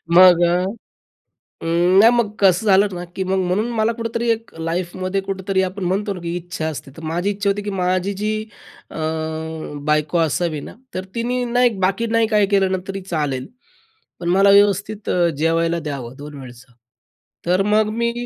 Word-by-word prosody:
मग 180 Hz, -1 st, +8 dB
अ, 175 Hz, +1 st, +2 dB, 1.0 s
अं, 175 Hz, +3 st, +3 dB
नाही 225 Hz, +3 st, +8 dB
मग 235 Hz, -4 st, 0 dB
कसं 195 Hz, +1 st, +4 dB
झालं 200 Hz, +1 st, +5 dB
ना, 175 Hz, 0 st, -5 dB
की 190 Hz, -, -1 dB
मग 190 Hz, +1 st, 0 dB
म्हणून 205 Hz, +6 st, 0 dB
मला 220 Hz, 0 st, +1 dB
कुठेतरी 230 Hz, 0 st, -3 dB
एक 225 Hz, 0 st, -2 dB
लाईफ 170 Hz, +2 st, -2 dB
मध्ये 185 Hz, +1 st, -1 dB
कुठेतरी 195 Hz, 0 st, -1 dB
आपण 190 Hz, +1 st, -3 dB
म्हणतो 200 Hz, +3 st, 0 dB
ना, 180 Hz, -, -8 dB
की 170 Hz, 0 st, -4 dB
इच्छा 175 Hz, -2 st, -4 dB
असते. 145 Hz, -3 st, -7 dB
तर 160 Hz, -, -10 dB
माझी 170 Hz, +5 st, -1 dB
इच्छा 200 Hz, 0 st, 0 dB
होती 205 Hz, +1 st, -2 dB
की 205 Hz, -, -4 dB
माझी 185 Hz, 0 st, 0 dB
जी 210 Hz, +2 st, -2 dB, 0.6 s
अ, -, -, -9 dB, 0.9 s
बायको 150 Hz, +2 st, +1 dB
असावी 160 Hz, -1 st, 0 dB
ना, -, -, -10 dB, 0.2 s
तर 185 Hz, -, -3 dB
तिने 245 Hz, +2 st, -1 dB
ना 245 Hz, +1 st, +1 dB
एक, 230 Hz, -5 st, +2 dB
बाकी 195 Hz, +5 st, +1 dB
नाही 230 Hz, 0 st, +2 dB
काही 210 Hz, -2 st, +3 dB
केलं 195 Hz, -1 st, +2 dB
ना 190 Hz, -, +1 dB
तरी 195 Hz, 0 st, -4 dB
चालेल 150 Hz, -8 st, -2 dB, 0.7 s
पण 170 Hz, -, -3 dB
मला 195 Hz, +2 st, +5 dB
व्यवस्थित 200 Hz, +1 st, +3 dB
अ, 175 Hz, -1 st, +2 dB
जेवायला 165 Hz, +2 st, +1 dB
द्यावं 140 Hz, -6 st, -6 dB
2 145 Hz, 0 st, -9 dB
वेळचं. 125 Hz, 0 st, -13 dB, 0.7 s
तर 180 Hz, +2 st, +3 dB
मग, 210 Hz, +1 st, +2 dB
मी 235 Hz, +1 st, 0 dB
190 Hz, 185 wpm, -20 LUFS, 170-205 Hz, 1.0 s, मग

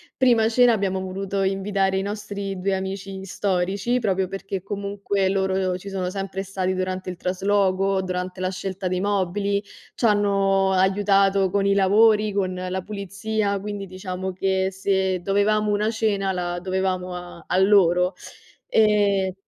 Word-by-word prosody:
prima 235 Hz, -4 st, +4 dB
cena 245 Hz, +1 st, +5 dB
abbiamo 195 Hz, -3 st, 0 dB
voluto 195 Hz, +1 st, -3 dB
invitare 195 Hz, 0 st, 0 dB
i -, -, 0 dB
nostri 200 Hz, -1 st, -5 dB
2 195 Hz, +2 st, 0 dB
amici 190 Hz, 0 st, -5 dB
storici 195 Hz, +5 st, -1 dB
proprio 190 Hz, -4 st, 0 dB
perché 195 Hz, -1 st, -5 dB
comunque 200 Hz, -1 st, -2 dB
loro 190 Hz, -1 st, 0 dB
ci 200 Hz, +2 st, -9 dB
sono 185 Hz, -2 st, -2 dB
sempre 195 Hz, 0 st, -4 dB
stati 190 Hz, -1 st, -2 dB
durante 185 Hz, 0 st, -3 dB
il 180 Hz, -, -9 dB
trasloco, 195 Hz, +1 st, +1 dB
durante 185 Hz, 0 st, -4 dB
la 185 Hz, 0 st, 0 dB
scelta 190 Hz, 0 st, -4 dB
dei 180 Hz, 0 st, -1 dB
mobili, 200 Hz, 0 st, 0 dB, 0.3 s
ci -, -, -2 dB
hanno 195 Hz, -2 st, +3 dB
aiutato 195 Hz, 0 st, +3 dB
con 200 Hz, 0 st, +1 dB
i 200 Hz, -, +4 dB
lavori, 210 Hz, +2 st, +4 dB
con 195 Hz, -2 st, -1 dB
la 185 Hz, +1 st, -3 dB
pulizia, 200 Hz, +1 st, -2 dB
quindi 205 Hz, 0 st, -5 dB
diciamo 185 Hz, 0 st, -5 dB
che 190 Hz, 0 st, 0 dB
se 190 Hz, -1 st, 0 dB
dovevamo 205 Hz, +3 st, +1 dB
una 210 Hz, +2 st, +1 dB
cena 205 Hz, -4 st, 0 dB
la 175 Hz, -1 st, -3 dB
dovevamo 185 Hz, -1 st, -2 dB
a 175 Hz, -2 st, -9 dB
a 180 Hz, -, 0 dB
loro, 185 Hz, -2 st, +4 dB, 0.6 s
ehm 205 Hz, -3 st, +3 dB
195 Hz, 150 wpm, -23 LUFS, 185-200 Hz, 0.6 s, cena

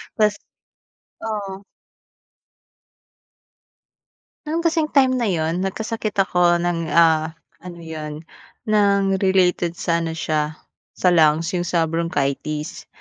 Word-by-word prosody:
Tapos 210 Hz, -2 st, +2 dB, 0.9 s
oh. 200 Hz, -3 st, -4 dB, 2.9 s
No'n 330 Hz, +2 st, -1 dB
kasing 325 Hz, -2 st, +1 dB
time 260 Hz, -2 st, +4 dB
na 235 Hz, -, 0 dB
'yon 165 Hz, -1 st, 0 dB
nagkasakit 215 Hz, +2 st, -3 dB
ako 180 Hz, -3 st, +3 dB
ng, 170 Hz, -2 st, -1 dB
ah, 160 Hz, -1 st, +4 dB, 0.2 s
ano 175 Hz, -1 st, -10 dB
'yon 155 Hz, -1 st, -7 dB, 0.5 s
ng 200 Hz, -2 st, +3 dB
related 180 Hz, -3 st, +2 dB
sa 170 Hz, 0 st, 0 dB
ano 165 Hz, -1 st, -3 dB
siya 155 Hz, -1 st, -1 dB, 0.4 s
sa 180 Hz, -, +2 dB
lungs, 160 Hz, +1 st, +3 dB
'yung 175 Hz, -1 st, -2 dB
sa 170 Hz, -2 st, +2 dB
bronchitis. 155 Hz, -2 st, -2 dB
175 Hz, 105 wpm, -21 LUFS, 160-200 Hz, 2.9 s, time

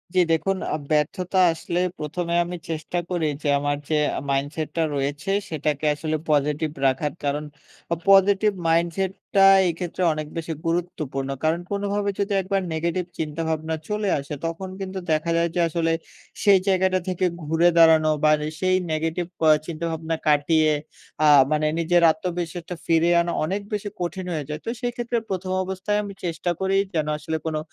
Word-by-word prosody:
জী, -, -, +5 dB
দেখুন, 195 Hz, +4 st, 0 dB, 0.2 s
আ -, -, +1 dB, 0.2 s
ব্যর্থতা 180 Hz, +5 st, 0 dB, 0.2 s
আসলে 170 Hz, +2 st, -3 dB, 0.2 s
১ম 165 Hz, +4 st, -3 dB
এ -, -, +2 dB
আমি 175 Hz, 0 st, -5 dB
চেষ্টা 160 Hz, +2 st, -3 dB
করি 170 Hz, -4 st, 0 dB, 0.2 s
যে, -, -, -1 dB
আমার 145 Hz, 0 st, -1 dB
যে 155 Hz, -, +2 dB, 0.3 s
মাইন্ডসেটটা 145 Hz, +4 st, -1 dB
রয়েছে, 145 Hz, +6 st, -2 dB, 0.2 s
সেটাকে 150 Hz, -1 st, -2 dB
আসলে 155 Hz, +1 st, -2 dB
পজিটিভ 150 Hz, +1 st, +1 dB, 0.2 s
রাখার। 135 Hz, +2 st, 0 dB
কারণ 145 Hz, +1 st, -1 dB, 0.7 s
পজিটিভ 195 Hz, +2 st, +5 dB, 0.2 s
মাইন্ডসেটটা 185 Hz, +4 st, +1 dB, 0.2 s
এইক্ষেত্রে 175 Hz, +1 st, -4 dB
অনেক 155 Hz, -1 st, -5 dB
বেশি 165 Hz, 0 st, -3 dB
গুরুত্বপূর্ণ। 155 Hz, -6 st, -2 dB
কারণ 160 Hz, +2 st, +2 dB
কোনোভাবে 200 Hz, 0 st, -1 dB
যদি 200 Hz, 0 st, 0 dB
একবার 195 Hz, +1 st, -1 dB
নেগেটিভ 170 Hz, +2 st, -1 dB
চিন্তা-ভাবনা 160 Hz, +1 st, -2 dB
চলে 210 Hz, -1 st, -1 dB
আসে, 140 Hz, +2 st, -7 dB
তখন 170 Hz, +3 st, -4 dB
কিন্তু 190 Hz, 0 st, -4 dB
দেখা 155 Hz, +2 st, +1 dB
যায় 170 Hz, 0 st, +2 dB
যে, -, -, +1 dB
আসলে 165 Hz, 0 st, 0 dB, 0.5 s
সেই 200 Hz, -3 st, +6 dB
জায়গাটা 185 Hz, -1 st, +3 dB
থেকে 185 Hz, 0 st, 0 dB, 0.2 s
ঘুরে 160 Hz, +3 st, +3 dB
দাঁড়ানো 160 Hz, -1 st, +6 dB
বার 155 Hz, 0 st, +5 dB, 0.2 s
সেই 185 Hz, 0 st, +2 dB, 0.2 s
নেগেটিভ 165 Hz, +2 st, -1 dB, 0.2 s
ক -, -, -1 dB, 0.2 s
চিন্তা-ভাবনা 165 Hz, 0 st, -3 dB
কাটিয়ে 155 Hz, +1 st, +3 dB, 0.5 s
আ -, -, +6 dB, 0.2 s
মানে 155 Hz, 0 st, +1 dB
নিজের 175 Hz, +1 st, +3 dB
আত্মবিশ্বাসটা 175 Hz, +1 st, -4 dB
ফিরে 165 Hz, +1 st, +3 dB
আনা 170 Hz, 0 st, -2 dB
অনেক 195 Hz, +4 st, -2 dB
বেশি 205 Hz, 0 st, -2 dB
কঠিন 180 Hz, +1 st, -3 dB
হয়ে 150 Hz, -3 st, -3 dB
যায়। 150 Hz, 0 st, -4 dB
তো, -, -, -2 dB
সেক্ষেত্রে 240 Hz, -1 st, -2 dB
১ম 185 Hz, -1 st, -3 dB
অবস্থায় 190 Hz, +2 st, -1 dB
আমি 200 Hz, -1 st, -7 dB
চেষ্টা 170 Hz, +1 st, -1 dB
করি, 190 Hz, 0 st, +1 dB, 0.2 s
যেনো 155 Hz, -2 st, 0 dB
আসলে 160 Hz, +2 st, -3 dB
কোনো 155 Hz, -1 st, -1 dB
165 Hz, 155 wpm, -24 LUFS, 155-185 Hz, 0.7 s, সেই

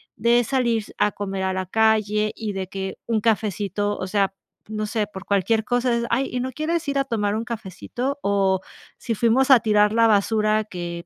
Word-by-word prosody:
de 235 Hz, +2 st, +3 dB
salir 235 Hz, -3 st, 0 dB
a 205 Hz, 0 st, +3 dB
comer 195 Hz, -1 st, -4 dB
a 190 Hz, 0 st, 0 dB
la 185 Hz, -1 st, -3 dB
calle 215 Hz, 0 st, +2 dB
y 215 Hz, -3 st, -4 dB
de 190 Hz, -1 st, -4 dB
que 190 Hz, 0 st, -5 dB
un 220 Hz, -2 st, +1 dB
cafecito, 205 Hz, -2 st, 0 dB
o 185 Hz, -, -4 dB
sea, 195 Hz, -1 st, +1 dB, 0.3 s
no 215 Hz, 0 st, -3 dB
sé, 215 Hz, -1 st, -1 dB
por 190 Hz, -2 st, -9 dB
cualquier 205 Hz, +3 st, +1 dB
cosa 245 Hz, 0 st, +1 dB
es: 235 Hz, -, -1 dB
"Ay, 260 Hz, +3 st, 0 dB
¿y 250 Hz, -, -2 dB
no 260 Hz, +1 st, -3 dB
quieres 315 Hz, +3 st, -2 dB
ir 280 Hz, -, 0 dB
a -, -, +2 dB
tomar 215 Hz, -5 st, -1 dB
un 225 Hz, -, -2 dB
cafecito?" 235 Hz, +5 st, -4 dB
O 195 Hz, -2 st, +2 dB, 0.4 s
si 235 Hz, -, -3 dB
fuimos 250 Hz, +5 st, +3 dB
a 255 Hz, -, +9 dB
tirar 210 Hz, -1 st, +3 dB
la 230 Hz, 0 st, +5 dB
basura 215 Hz, +1 st, +2 dB
que 175 Hz, -3 st, -6 dB
215 Hz, 200 wpm, -23 LUFS, 200-235 Hz, 0.4 s, a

